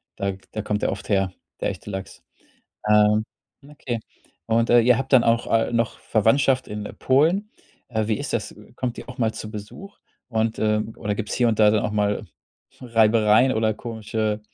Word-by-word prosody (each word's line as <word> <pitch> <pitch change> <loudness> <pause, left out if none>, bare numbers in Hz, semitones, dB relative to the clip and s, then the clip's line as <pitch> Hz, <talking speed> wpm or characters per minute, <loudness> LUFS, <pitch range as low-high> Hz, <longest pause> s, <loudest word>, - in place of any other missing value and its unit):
Da 100 0 -1
g 95 - -10
da 110 - -2
kommt 105 0 -2
der - - +1
oft - - -9
her, 95 -2 +1 0.3
der - - 0
echte - - -8
Lachs. 95 -1 -7 0.7
Ähm, 105 0 +5 0.5
okay. 125 -5 -5 0.5
Und, 115 +1 +2
äh, 120 - +6
ihr 125 +1 +4
habt 135 +1 -4
dann 125 - +7
auch, 115 0 +2
äh, 115 +1 +2
noch 115 -1 0
Verwandtschaft 130 +4 +2
in, 105 0 -5
äh, - - -8
Polen. 165 +11 +2 0.4
Äh, 110 -3 -1
wie 110 -2 0
ist - - -4
das? - - -2 0.2
Kommt 125 -2 -3
die - - -8
auch 130 - -9
mal 115 -3 +1
zu 110 - -7
Besuch? 110 - -10 0.3
Und, 110 -1 -1
äh 105 0 +2 0.2
oder 105 0 -2
gibt's 105 0 -4
hier 120 - +2
und 110 - 0
da 105 - +7
dann 105 -1 +1
auch 105 - -2
mal 105 -1 0 0.6
Reibereien 115 0 +4
oder 110 -1 +1
komische 110 -2 -3
110 Hz, 195 wpm, -23 LUFS, 105-120 Hz, 0.7 s, dann